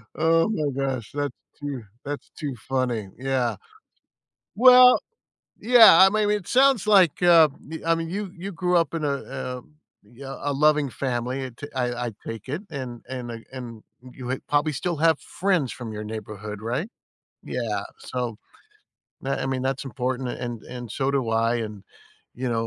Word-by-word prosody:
Oh 165 +4 +3
my 155 -9 0
gosh, 135 -5 -2
that's 145 -2 -2 0.2
too 140 -5 -5 0.2
that's 145 0 -5
too 145 -4 -3 0.2
funny, 125 -6 -1
yeah. 130 -1 0 1.0
Well, 250 +2 +8 0.6
yeah, 225 -7 +8
I 190 - +9
m 200 - 0
I 215 - +2
mean, 210 0 +2
it 190 -2 -11
sounds 265 -4 +4
like, 185 -5 +4
uh 165 -3 +8 0.4
I 165 0 +3
mean, 165 0 -4
you 195 0 -4
you 195 +3 -5
grew 180 0 0
up 170 -1 +2
in 160 -2 -2
a, 140 - +1 0.3
uh, 125 -1 -5 0.4
yeah, 135 +6 -9
a 145 - -1
loving 150 0 +3
family, 130 +1 -2
I - - -5
ta 145 - -8
I 125 -1 -1
I - - -4 0.2
take 115 +3 -7
it, 155 +8 -3
and 130 -5 -6
and 125 -2 -5
I 115 -1 -8
and 120 -4 -8 0.3
you 125 -1 -7
ha 130 - -1
probably 150 +1 +2
still 170 +4 -2
have 160 -1 +3
friends 180 -9 0
from 115 -3 -7
your 105 - -5
neighborhood, 105 -1 -7
right? 125 - -2 0.6
Yeah, - - -2 0.2
so 120 - -4 0.8
tha 135 +1 -2
I - - -1
mean, 130 -1 -2
that's 135 +1 -2
important 125 +1 -3 0.2
and 120 -2 -5
and 120 -2 -8
so 135 0 0
do 140 -2 +1
I, 115 +1 +2
and, 105 -2 -10 0.5
you 125 +1 -3
know, 115 -1 0
135 Hz, 175 wpm, -24 LUFS, 120-165 Hz, 1.0 s, I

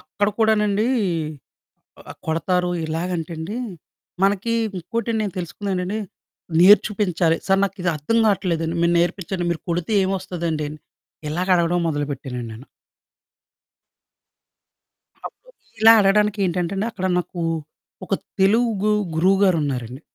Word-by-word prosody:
అక్కడ 205 0 -1
కూడానండీ, 215 0 +2 1.2
ఆహ్, - - -9
కొడతారు 180 +2 0 0.2
ఇలాగంటండి. 165 +3 -4 0.7
మనకీ 205 +4 +1 0.2
ఇంకోటి 230 +6 -3
నేను 205 -3 -2
తెలుసుకున్నానండి, 185 +2 -3 0.6
నేర్ 195 +2 +8
చుపించాలి, 180 -5 +1
"సారు 195 0 +3
నాకిది 185 -2 -2
అర్థం 150 +11 -1
కావట్లేదండి, 170 -5 0
మీరు 170 0 +3
నేర్పించండి, 175 +1 -1
మీరు 165 - -2
కొడితే 175 +5 -2
ఏమొస్తదండి." 180 -5 -2
అని 155 - -9 0.5
ఇలాగ 175 +5 -2
అడగడం 175 +1 +1
మొదలుపెట్టానండి 140 -5 -4
నేను. 120 +5 -11 2.6
అప్పుడు - - -14 0.3
ఇలా 225 +1 +9
అడగడానికి 210 +1 +3
ఏంటంటే 175 0 -1
అండి, 205 +4 -1
అక్కడ 190 -4 -3
నాకూ 175 -1 -4 0.6
ఒక 195 - 0 0.3
తెలుగు 215 +1 +3 0.2
గురువుగారున్నారండి. 160 - +1
180 Hz, 105 wpm, -22 LUFS, 165-205 Hz, 2.6 s, ఇలా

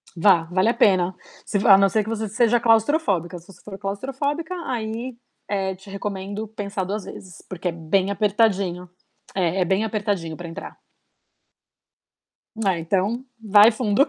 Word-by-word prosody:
Vá, 175 -1 +4
vale 185 +4 +3
a 235 - +2
pena. 185 -4 +3 0.3
Se 200 - -1
v - - 0
a 195 - +9
não 195 0 +4
ser 215 +1 +1
que 220 - -7
você 220 -1 -2
seja 235 +3 +3
claustrofóbica, 225 - +2
se 170 - -21
você - - -19
for 195 -2 -8
claustrofóbica, 275 - -3
aí, 235 +1 -4 0.3
eh, 195 -2 -1
te 190 +2 -15
recomendo 200 +1 -5
pensar 200 -2 -4
2 200 +2 -3
vezes, 185 -3 -11
porque 180 0 -4
é - - -2
bem 170 +4 0
apertadinho 200 -3 +1 0.5
é 185 0 +1
é - - +3
bem 190 +4 +1
apertadinho 205 -7 -2
pra 175 - -7
entrar. 165 - -9 1.9
É, 180 -3 0
então, 200 +9 -1
vai 210 0 +6
fundo. 220 +4 +2
200 Hz, 160 wpm, -23 LUFS, 185-220 Hz, 1.9 s, a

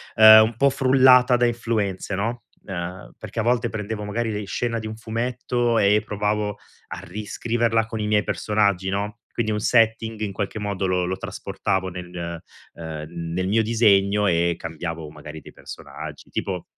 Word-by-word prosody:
ehm, 110 0 +10
un 110 0 -2
po' 140 +2 +4
frullata 130 -1 +5
da 120 - +3
influenze, 110 -5 -2
no. 115 +4 -3 0.2
Ehm, 90 -1 -6
perché - - -7
a - - +1
volte 120 0 +1
prendevo, 105 -1 -5
magari, 110 +2 -2
le 105 -1 -4
scena 115 +3 -2
di 110 - -8
un 110 - -6
fumetto 120 +1 -1
e 105 +1 +4
provavo 105 0 -1 0.3
a - - -6
riscriverla 115 +4 -1
con 110 -1 -5
i 105 - -1
miei 105 -1 +2
personaggi, 100 -3 0
no. 105 +3 -3
Quindi 110 -2 -1
un 105 - -1
setting 115 0 +2
in 100 -2 -2
qualche 100 +2 -4
modo 100 -2 -2
lo 90 -1 +1
lo 95 +1 -2
trasportavo 95 0 -3
nel, 90 0 -9 0.6
ehm, 80 -2 -7 0.3
nel 95 +1 -1
mio 110 +3 +2
disegno, 105 -2 +3
e 85 0 +2
cambiavo 80 -1 -6
magari 75 0 -10
dei - - -14
personaggi, - - -10
tipo 90 -3 -3
105 Hz, 170 wpm, -23 LUFS, 95-115 Hz, 0.6 s, ehm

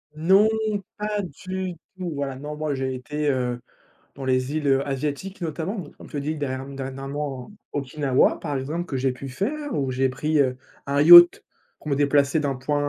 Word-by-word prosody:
Non 190 +7 +5 0.5
pas 210 0 -2
du 185 +2 -5 0.2
tout, 180 -2 -4
voilà, 140 -2 -3
non 150 +2 -6
moi 150 -1 -2
j'ai 130 -1 -2
été, 150 +4 -2
heu, 125 -3 -1 0.6
dans 135 - -7
les 130 +2 0
îles, 150 -2 -1
heu, 135 0 +3
asiatiques, 145 +8 -3
notamment 170 +5 -3
n - - -14
comme - - -13
tu 145 - -4
dis 155 +2 -2
dern 135 -1 -4
dernièrement, 135 +1 -5 0.2
Okinawa, 140 -1 +1
par 145 -4 -3
exemple, 155 +7 -3
que 135 - -4
j'ai 130 +1 +1
pu 135 +2 -8
faire 280 - -3
où 135 -2 -1
j'ai 130 +1 +1
pris, 150 +4 0
heu, 130 -2 +2 0.3
un 140 0 +1
yacht 175 +2 +10 0.3
pour - - -13
me 140 - +1
déplacer 145 +1 +2
d'un 140 -2 -1
point 145 +3 -1
A, - - 0
145 Hz, 190 wpm, -24 LUFS, 135-155 Hz, 0.6 s, yacht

